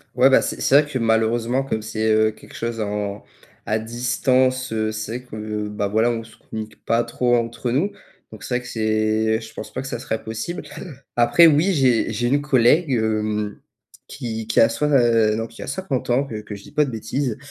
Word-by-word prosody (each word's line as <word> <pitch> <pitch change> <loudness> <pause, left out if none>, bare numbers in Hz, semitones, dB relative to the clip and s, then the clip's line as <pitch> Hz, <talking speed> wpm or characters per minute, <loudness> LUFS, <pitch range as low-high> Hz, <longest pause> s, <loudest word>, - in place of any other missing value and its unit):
Ouais, 130 - +6
bah, 135 - +5
c'est - - -4
c'est 140 - +6
vrai 145 0 -1
que, 130 - -1
malheureusement, 115 +3 +1
comme 110 -5 -2
c'est, 110 0 -1
heu, 110 0 +4
quelque - - -16
chose 115 0 -3
en 105 -1 -3 0.4
à 110 - 0
distance, 125 +2 +1
heu, 110 -1 -1
c'est 110 +2 -4
vrai 125 - -17
que, 105 -1 -4
bah, 105 -1 -2
voilà, 110 +4 +2
on 115 -1 -3
se 110 0 -16
communique 110 0 -9
pas 115 +1 +2
trop 120 +1 +1
entre 115 0 -2
nous, 160 +12 +1 0.4
donc - - -11
c'est 125 - -2
vrai - - -11
que 125 - -11
c'est 110 0 +1
je 110 0 -11
pense - - -8
pas 130 - -3
que 135 - -7
ça - - -3
serait 115 -2 -4
possible. 115 +10 -4 0.5
Après, 120 +8 +6
oui, 160 +5 +3
j'ai 130 -7 +2
j'ai 120 +3 0
une 140 +3 +2
collègue, 145 +3 +3
hem, 110 -3 -1 0.5
qui 115 -5 -5
qui 110 - +2
a 115 - +7
soi 150 - -1
heu, 115 -5 +4
non, 115 +1 -3
qui 115 - -13
a - - -9
50 140 -5 -3
ans, 135 +3 +2
que 110 -5 -6
que 105 - -9
je 100 - -11
dis - - -14
pas 150 - +4
de 135 - -5
bêtise, 115 +2 -2
115 Hz, 220 wpm, -22 LUFS, 110-130 Hz, 0.5 s, a